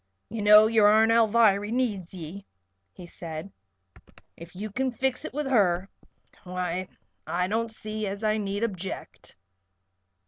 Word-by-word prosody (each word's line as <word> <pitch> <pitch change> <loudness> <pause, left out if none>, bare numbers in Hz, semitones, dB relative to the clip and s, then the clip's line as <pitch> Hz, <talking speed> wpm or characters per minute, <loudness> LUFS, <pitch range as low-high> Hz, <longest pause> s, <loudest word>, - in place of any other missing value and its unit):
"You 225 0 -5
know 210 +1 +8
your 220 -2 +4
Aunt 220 +2 +5
Alviry 220 -2 +3
needs 215 -8 -1
ye," 180 +2 -9 0.4
he 175 - -12
said. 165 +1 -8 0.8
"If 170 +2 -13
you 210 +3 -6
kin 260 +5 -1
fix 255 +1 -2
it - - -5
with 295 +2 -3
her, 195 -7 +2 0.5
why 180 0 -3 0.4
I 180 +1 0
don't 225 +3 -1
see 215 -1 -4
as 200 +2 -5
I 215 0 +1
need 200 0 -3
object." 190 -4 -6
205 Hz, 140 wpm, -26 LUFS, 185-225 Hz, 0.8 s, know